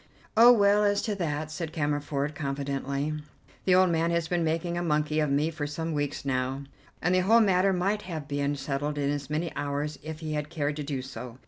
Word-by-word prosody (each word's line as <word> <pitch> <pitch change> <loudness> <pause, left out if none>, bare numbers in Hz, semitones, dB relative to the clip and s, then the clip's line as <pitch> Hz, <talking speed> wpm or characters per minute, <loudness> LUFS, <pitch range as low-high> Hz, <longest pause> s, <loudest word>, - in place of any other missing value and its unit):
"Oh, 235 +2 +9
well, 205 -2 +5
as 205 0 +2
to 215 - -1
that," 155 -3 -2
said 160 +1 -4
Cammerford, 145 -1 -1
confidently, 140 0 -2 0.5
"the 185 - +5
old 185 -1 +5
man 165 0 +1
has 170 -1 0
been 175 0 0
making 165 +2 -1
a 175 - -1
monkey 155 -2 +1
of 150 -1 +1
me 145 +4 +1
for 155 -2 -4
some 160 +2 -3
weeks 145 -1 -2
now, 130 +1 -1 0.4
and 175 - +2
the 185 - +4
whole 215 +6 +5
matter 195 -3 +4
might 195 +3 0
have 160 -7 -6
been 145 0 -1
settled 145 +2 -3
in 140 0 +1
as 145 -1 -4
many 160 +3 -2
hours 145 +1 -3
if 155 +1 -7
he 155 -1 -3
had 150 0 -2
cared 150 -3 -1
to 150 - -3
do 140 -3 -3
so. 125 -2 -8
150 Hz, 215 wpm, -28 LUFS, 145-175 Hz, 0.5 s, Oh